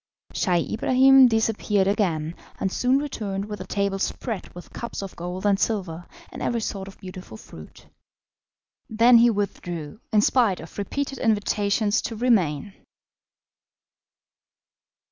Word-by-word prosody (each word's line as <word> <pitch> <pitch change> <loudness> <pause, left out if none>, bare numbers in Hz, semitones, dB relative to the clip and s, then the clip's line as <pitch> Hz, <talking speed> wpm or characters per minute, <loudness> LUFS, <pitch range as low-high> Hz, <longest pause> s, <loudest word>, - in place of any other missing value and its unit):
Scheih 175 -4 0
Ibrahim 260 +3 +6
disappeared 220 -3 +1
again, 170 -6 0 0.3
and 190 - -1
soon 250 +5 +2
returned 210 -9 -3
with 210 -2 -7
a 185 - -8
table 200 -1 -1
spread 220 -1 -4
with 175 - -12
cups 235 -3 -6
of 195 - -8
gold 180 +3 -6
and 200 -1 +3
silver, 180 -6 -2 0.2
and - - -9
every 240 -1 0
sort 195 -3 -4
of 195 - -12
beautiful 185 - -10
fruit. 80 -7 -14 1.0
Then 230 +2 +6
he 240 +1 +6
withdrew, 180 -5 -4
in 210 -2 +4
spite 220 -5 +2
of - - -11
repeated 275 +7 -3
invitations 210 -1 +1
to 230 - -5
remain. 200 - +1
205 Hz, 130 wpm, -24 LUFS, 185-230 Hz, 1.0 s, Ibrahim